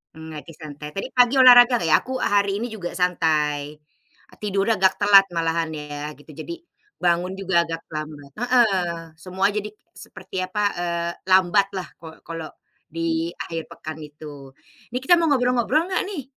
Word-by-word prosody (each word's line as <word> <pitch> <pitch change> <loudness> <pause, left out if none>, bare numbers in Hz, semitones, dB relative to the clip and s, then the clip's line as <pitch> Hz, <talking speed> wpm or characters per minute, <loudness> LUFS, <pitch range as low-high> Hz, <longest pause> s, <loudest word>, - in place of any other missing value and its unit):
Mmm, 160 0 -10
lagi 160 +2 -10
santai. 150 -1 -9
Tadi 195 - -3
pagi 245 +1 +4
olahraga 245 0 +8
nggak 170 - -1
ya? 155 - +6
Aku 260 - -6
hari 200 -1 +2
ini - - -2
juga 190 -6 -5
santai. 155 -5 0 0.7
Tidurnya 200 +2 +1
agak 190 0 +4
telat 200 -1 +7
malahan 165 0 0
ya, 150 0 -6
gitu. 145 - -15
Jadi, 340 - -6 0.4
bangun 175 +1 +1
juga 185 -3 +2
agak 165 0 -5
terlambat. 155 -2 -7
Heeh, 190 -9 +1
semua 185 +3 0
jadi 210 0 -3 0.3
seperti 185 -1 -7
apa, 195 +3 -2 0.2
eee, 170 -1 -2 0.2
lambat 190 +1 +4
lah 185 - -5
kalau 160 -1 -11
kalau 165 -2 -6 0.4
di 165 0 -2
akhir 165 -1 -5
pekan 155 0 -8
itu. 145 -2 -11 0.4
Ini 250 - -2
kita 350 +6 +6
mau 330 - +2
ngobrol-ngobrol 250 +2 +2
nggak 370 - 0
nih? 305 -9 -5
175 Hz, 160 wpm, -23 LUFS, 160-205 Hz, 0.7 s, olahraga